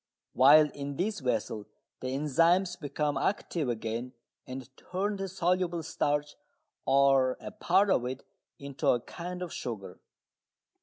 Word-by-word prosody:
While 150 +3 +7
in 140 0 -5
this 200 +5 -1
vessel 115 -5 -2 0.3
the 130 - -5
enzymes 165 +7 +2
become 150 -3 -2
active 170 -7 -1
again 115 +2 -3 0.3
and 130 0 -7
turn 200 +3 -3
the 195 0 -3
soluble 180 -2 0
starch, 145 -2 -1 0.5
or 135 -2 +4
a - - -7
part 200 -1 +2
of 125 - +2
it, 130 +1 -5 0.3
into 140 -1 -4
a 120 - +5
kind 180 +7 -6
of 175 - -6
sugar. 100 -6 -6
145 Hz, 135 wpm, -30 LUFS, 130-180 Hz, 0.5 s, While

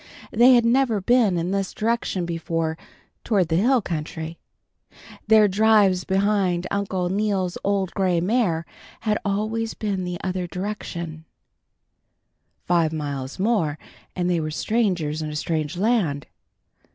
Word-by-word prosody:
They 245 +3 +6
had 235 -1 +4
never 235 -2 +3
been 215 -2 +3
in 170 +2 -1
this 195 -1 -2
direction 220 -5 -1
before, 165 -1 -2 0.5
toward 190 -7 +1
the 160 - +1
hill 240 +4 +3
country. 160 0 -5 0.9
Their 215 -1 +6
drives 205 -2 +3
behind 190 -2 +1
Uncle 190 -3 -1
Neal's 195 -2 0
old 195 -2 0
gray 185 -3 +1
mare 180 -4 +1 0.4
had 215 -2 0
always 215 +3 -2
been 200 -3 -2
the 180 -1 -4
other 185 -1 -2
way. 175 -5 -5 1.5
Five 170 -3 +2
miles 145 -4 -4
more 185 -7 +1 0.4
and 180 -1 -1
they 175 -2 +1
were 155 -1 -2
strangers 175 -5 0
in 155 - -3
a 150 - -6
strange 155 0 -2
land. 185 - +1
185 Hz, 130 wpm, -23 LUFS, 165-215 Hz, 1.5 s, They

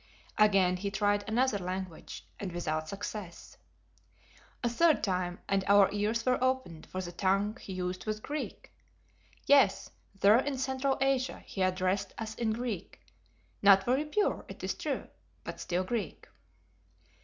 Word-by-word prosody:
Again 195 -4 +4
he 200 +2 -3
tried 205 0 +1
another 245 -1 +2
language 185 -2 -6
and 195 -3 -4
without 155 -2 -2
success. 200 -2 -7 1.1
A - - +3
third 310 +7 +3
time 180 -2 -1
and 195 -1 +1
our 200 -1 +6
ears 215 +3 0
were 255 0 +2
opened, 255 -12 -1
for 185 - -4
the 175 -1 -6
tongue 195 +4 +1
he 190 - -7
used 185 +2 -4
was 215 0 -1
Greek; 295 +7 -6 0.7
yes, 275 -9 +4 0.3
there 210 +4 +6
in 275 0 -2
Central 265 +1 0
Asia 270 -1 0
he 195 - -5
addressed 185 +1 0
us 220 -1 -4
in 225 0 -1
Greek, 220 -5 -4 0.6
not 195 -1 +7
very 260 +6 +1
pure, 405 +8 0
it - - -10
is - - -1
true, - - -3 0.4
but - - -7
still 180 +1 -1
Greek. 220 +3 -4
205 Hz, 145 wpm, -31 LUFS, 185-245 Hz, 1.1 s, not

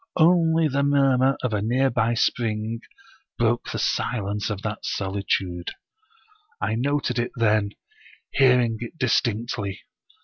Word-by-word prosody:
Only 165 -1 +4
the 140 -1 0
murmur 135 -2 +3
of 125 -3 -1
a 105 - 0
nearby 120 0 +1
spring 115 -1 -1 0.6
broke 120 0 +1
the - - -3
silence 105 -3 -1
of 105 -1 -4
that 105 0 -3
solitude. 95 -3 -2 0.9
I 110 - -1
noted 140 +3 0
it 120 +1 -2
then, 105 -3 +2 0.6
hearing 125 -4 +4
it 120 +7 -7
distinctly. 115 -5 -1
120 Hz, 115 wpm, -24 LUFS, 105-135 Hz, 0.9 s, Only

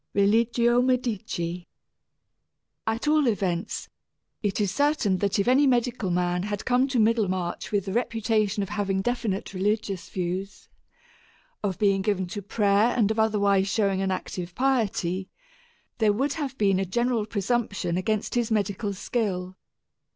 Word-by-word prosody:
II 200 - +3
RELIGIO 235 +3 +3
MEDICI 210 -9 -1 1.2
At 225 +6 -1
all 300 -2 +4
events, 195 -3 -1 0.5
it 205 -1 -1
is 200 -3 +1
certain 285 -9 +2
that 200 0 0
if 200 - +1
any 270 +3 +5
medical 240 -5 +1
man 180 0 0
had 205 +1 -4
come 255 +1 +3
to 265 -2 -1
Middlemarch 205 -6 0
with 200 -2 0
the 190 - -4
reputation 220 -3 0
of 195 - -6
having 195 -2 -1
definite 220 -5 -2
religious 195 -1 -1
views, 185 +2 -4 0.9
of 195 -3 -1
being 195 -2 +2
given 190 -2 0
to 205 - -5
prayer 205 +2 +2
and 220 -3 +3
of 220 - -1
otherwise 200 -3 +3
showing 195 -2 +1
an 195 - 0
active 180 -1 -4
piety, 200 -8 0 0.7
there 215 -2 +4
would 270 +6 0
have 275 -4 -4
been 195 -3 +2
a 195 - 0
general 235 +2 0
presumption 205 -4 -1
against 215 +3 -1
his 240 -2 0
medical 205 -1 -1
skill. 185 -4 -2
205 Hz, 145 wpm, -26 LUFS, 190-235 Hz, 1.2 s, any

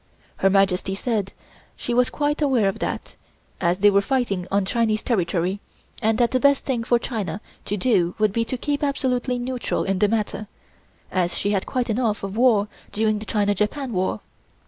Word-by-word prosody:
Her 195 - +3
Majesty 195 -1 +2
said 205 -2 -1 0.4
she 240 - -3
was 250 +1 +3
quite 295 +1 -1
aware 260 -8 +3
of 195 - -2
that, - - -4 0.5
as 175 0 +2
they 205 +1 +5
were 200 0 +4
fighting 200 -7 -1
on 200 0 +1
Chinese 220 0 0
territory, 185 -3 0 0.4
and 220 -1 +2
that 240 -1 +2
the 255 - +2
best 280 +1 +3
thing 245 -4 -1
for 240 +1 +3
China 215 -6 -3 0.3
to 205 - -2
do 180 -6 +2
would 215 -2 +2
be 230 - +1
to 255 +3 -3
keep 285 +3 -2
absolutely 255 -3 0
neutral 250 0 -2
in 195 -1 -1
the 210 - +4
matter, 215 0 -2 0.6
as 175 -2 0
she 205 - 0
had 195 -2 0
quite 250 -2 -1
enough 220 -2 0
of 195 0 -4
war 225 -4 +4 0.2
during 215 0 +1
the 215 - -8
China 205 0 +1
Japan 230 +6 -2
war. 185 0 -1
215 Hz, 190 wpm, -23 LUFS, 195-250 Hz, 0.6 s, they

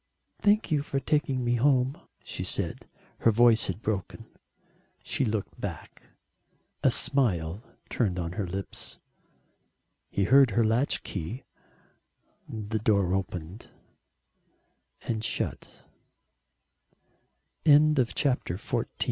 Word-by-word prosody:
"Thank 210 -1 +3
you 150 -2 +2
for 140 -1 -2
taking 135 -2 0
me 120 0 +1
home," 130 +1 +3 0.3
she - - -5
said; - - -3 0.3
her - - +4
voice 115 0 +4
had 95 +4 -5
broken. 110 +1 -3 0.8
She - - 0
looked 110 -4 -3
back - - -7 0.8
a - - +5
smile 95 - +2 0.3
turned 100 -7 0
on 85 -2 -3
to 90 - -10
her 100 -4 -1
lips. 95 +2 -6 1.1
He 100 - 0
heard 135 +5 +6
her 115 - +5
latch 115 +6 +1
key. 95 +8 -5 1.1
The 110 0 -3
door 100 -4 +2
opened 95 +1 -4 1.3
and 110 -2 -2
shut. - - -4 1.8
XV - - -7
A 150 +1 +7
TOUCH 145 - +1
OF 120 -2 +2
SPRING 140 -3 +1 0.2
[_To 110 - -15
W.Y. - - 0
115 Hz, 120 wpm, -28 LUFS, 100-135 Hz, 1.8 s, A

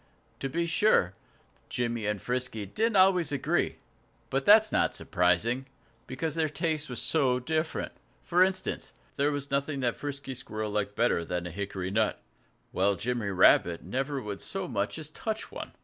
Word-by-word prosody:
To 135 - -2
be 170 +5 0
sure, 165 - +3 0.6
Jimmy 120 -3 -1
and 105 -1 -1
Frisky 125 -2 -3
did 225 - 0
not 190 -2 +8
always 180 -5 +1
agree 140 -3 0 0.6
but 135 +1 0
that 215 +1 +8
is 220 - -11
not - - +2
surprising, 110 +9 +1 0.4
because 140 +4 -3
their 160 -1 0
tastes 155 0 -2
were 125 - -5
so 130 -2 +2
different. 155 +5 -2 0.3
For 180 +1 +4
instance, 190 0 -2 0.2
there 145 +1 +2
was 145 -1 -4
nothing 140 0 -1
that 120 -2 +1
Frisky 140 -2 -5
Squirrel 110 -4 -4
liked 105 -1 -2
better 115 -8 +2
than 90 +1 -3
a 90 - -5
hickory 95 0 -4
nut, 110 +1 +1 0.5
while 100 +2 +2
Jimmy 115 +2 -2
Rabbit 90 -2 +4
never 135 +8 -2
would 105 -5 -6
so 195 -2 -4
much 100 0 -2
as 155 -1 -7
touch 220 +6 -4
one. - - -7
130 Hz, 170 wpm, -29 LUFS, 105-155 Hz, 0.6 s, not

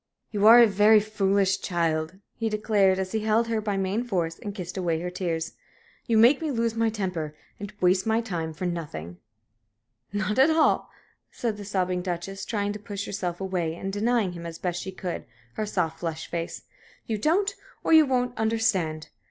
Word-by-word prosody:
"You 210 -1 +3
are 235 +2 +10
a 240 - +9
very 210 +1 +5
foolish 195 -2 +1
child," 165 -1 -1 0.2
he 225 -1 -1
declared, 210 -3 +2
as 190 -1 -3
he 220 - 0
held 220 +2 +1
her 225 -1 0
by 205 -2 -1
main 195 +4 0
force 175 -8 -2
and 205 -1 -6
kissed 180 -3 -6
away 170 -4 0
her 180 +1 -4
tears. 165 -3 -2 0.6
"You 230 -3 +3
make 245 +7 +6
me 320 - -1
lose 230 -4 0
my 230 0 +1
temper 180 -8 -3 0.2
and 200 -1 -6
waste 185 +3 +3
my 220 0 +3
time 175 -8 -3
for 160 +4 -5
nothing." 145 - -5 0.9
"Not 205 +3 -1
at 270 +4 +6
all," 320 0 +3 0.4
said 230 -3 -3
the 205 - -8
sobbing 185 -2 -1
Duchess, 180 +2 -4
trying 205 -2 -1
to 210 - -7
push 200 -1 -5
herself 180 -3 -3
away, 180 -4 -2
and 195 +3 -5
denying 220 -1 +1
him, 170 -1 -7
as 165 -1 -7
best 175 0 -2
she 190 - -5
could, 185 -2 -5 0.3
her 215 - -3
soft, 165 -6 -1
flushed 165 -2 -5
face. 170 0 -4 0.4
"You 220 -2 -2
don't, 390 - +2 0.3
or - - +2
you 315 -2 +7
won't, 250 -1 0
understand! 195 -8 0
195 Hz, 190 wpm, -26 LUFS, 175-220 Hz, 0.9 s, are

